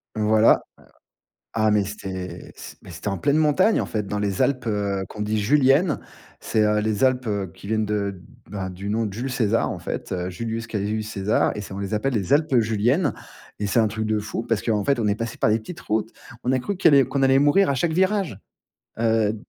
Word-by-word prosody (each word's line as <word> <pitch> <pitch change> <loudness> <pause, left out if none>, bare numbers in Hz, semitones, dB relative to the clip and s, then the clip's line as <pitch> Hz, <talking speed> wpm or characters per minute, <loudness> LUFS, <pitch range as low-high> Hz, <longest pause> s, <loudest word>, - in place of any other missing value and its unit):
Voilà. 110 +1 +4 1.0
Ah, 110 -1 +3
mais 105 -1 +3
c'est 95 -3 -7
c - - -9
beh - - -12
c'était 85 +4 -10
en 95 - -2
pleine 145 +1 +2
montagne 160 +8 +3
en - - -2
fait 105 -2 -3
dans 105 - -2
les 100 -2 0
Alpes, 130 -4 0
heu, 100 -2 -1
qu'on 105 - -9
dit 105 +1 -1
juliennes. 140 - +3 0.4
C'est 110 - +1
heu, 105 0 +2
les 110 +3 0
Alpes, 130 -1 +1
heu, 100 -4 -2
qui 100 - -11
viennent 110 -1 +1
de 100 -3 -2 0.3
ben, 95 -3 -4
du 95 +3 -7
nom 110 +1 0
de 100 - -6
Jules 125 +5 -4
César 115 -3 +1
en - - -5
fait, - - -5 0.2
Julius 115 +4 -4
Caius 110 0 -2
César 105 +1 +1
et - - -4
on 95 - -6
les 100 +2 -3
appelle 125 +5 0
les 100 +3 -1
Alpes 145 -3 +3
juliennes. 115 - +1 0.5
Et 105 - 0
c'est 115 - +1
un 110 - +4
truc 110 +1 -3
de 110 0 +1
fou 110 +2 -4
parce 115 -3 -1
qu'en 105 -3 0
fait, 140 -3 +2
on 110 - 0
est 100 - +2
passé 115 +1 -5
par 110 - +2
des 110 +1 +2
petites 175 +10 -9
routes. 110 +1 -1 0.3
On 125 - 0
a 130 - +2
cru 195 +10 -3
qu'il 170 -4 +4
y 140 - +7
allait 135 - +5
qu'on 140 -1 -1
allait 135 0 +5
mourir 145 +5 +4
à - - +1
chaque 160 +6 0
virage. 185 - +1 0.6
Heu 110 -2 +2
110 Hz, 230 wpm, -23 LUFS, 105-130 Hz, 1.0 s, y